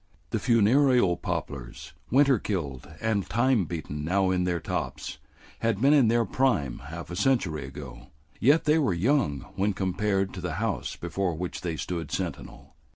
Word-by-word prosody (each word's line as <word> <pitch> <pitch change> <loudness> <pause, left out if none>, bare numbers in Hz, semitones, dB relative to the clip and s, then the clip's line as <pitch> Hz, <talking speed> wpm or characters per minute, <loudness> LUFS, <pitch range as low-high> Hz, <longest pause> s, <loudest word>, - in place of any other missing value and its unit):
The - - 0
funereal 120 -3 +4
poplars, 60 -7 -5 0.2
winter 135 -1 +4
killed 70 -10 -4
and 110 -3 0
time 120 -4 +2
beaten 75 -3 -5
now 95 +3 +2
in 90 -1 +1
their 90 -1 0
tops, - - -4 0.4
had 115 -3 0
been 140 +5 +5
in 140 -6 +5
their 115 +1 +3
prime 110 - 0
half 85 +4 -7
a - - -4
century 90 - +1
ago, 65 -3 -9 0.3
yet 145 +7 +4
they 155 +1 +3
were 110 - +1
young 95 - +1 0.2
when 100 +2 +1
compared 95 +1 0
to 90 - -6
the 90 -3 -3
house 100 - -2
before 95 -4 -2
which 90 +2 -5
they 85 -3 -2
stood 85 -1 -4
sentinel. 90 -7 -5
95 Hz, 160 wpm, -27 LUFS, 80-115 Hz, 0.4 s, been